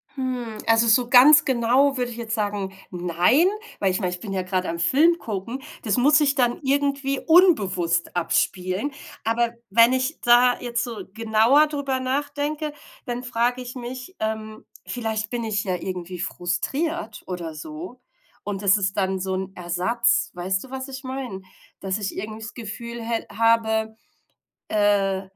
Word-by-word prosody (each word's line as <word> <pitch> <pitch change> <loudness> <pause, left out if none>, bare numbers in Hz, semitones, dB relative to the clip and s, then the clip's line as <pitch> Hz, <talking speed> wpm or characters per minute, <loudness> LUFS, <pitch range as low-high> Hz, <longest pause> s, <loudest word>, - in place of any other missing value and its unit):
Hm. 250 -4 -4
Also 225 +1 +4
so 240 +2 +4
ganz 285 +4 +8
genau 260 +2 +2
würde 245 -1 -2
ich 230 - -9
jetzt 230 -1 -4
sagen, 205 -2 -2 0.2
nein, 180 - +2 0.3
weil 195 -2 +2
ich 185 - -1
meine, 180 -3 -1
ich 180 - -6
bin 195 -1 -6
ja 190 - 0
gerade 185 -1 -2
am 170 0 -4
Film 310 - +4
gucken. 230 +5 -5 0.2
Das 215 +1 +1
muss 290 +4 +5
sich 285 -2 +3
dann 245 -3 +1
irgendwie 275 0 0
unbewusst 195 - +3
abspielen. 185 - 0 0.3
Aber 230 +1 0 0.2
wenn 230 +4 +5
ich 260 +4 -1
da 245 +1 +5
jetzt 240 -1 -2
so 225 -5 -6
genauer 230 +7 +4
drüber 280 -3 -2
nachdenke, 290 +3 -2 0.3
dann 245 +1 -4
frage 245 +1 0
ich 250 +1 -8
mich, 255 +8 -7
ähm, 220 0 -4 0.2
vielleicht 220 -3 -3
bin 240 -1 -3
ich 215 -1 -1
ja 185 -2 -1
irgendwie 180 -1 -6
frustriert 225 - -3
oder 175 -3 -5
so. 160 +9 -8 0.4
Und 200 -1 -4
das 200 +1 +5
ist 195 -1 -1
dann 190 -1 0
so 190 0 -2
'n 190 0 -4
Ersatz. 185 +8 +1
Weißt 185 +3 -2
du, 265 - -13
was 265 +1 -5
ich 265 0 -8
meine? 255 -7 -5 0.4
Dass 195 +1 -1
ich 200 - -4
irgendwie 215 +3 -5
das 220 - -7
Gefühl 235 +1 -7
hä 230 0 -2
habe, 220 0 +1 0.7
äh, 200 -2 +2
230 Hz, 165 wpm, -23 LUFS, 195-260 Hz, 0.7 s, ganz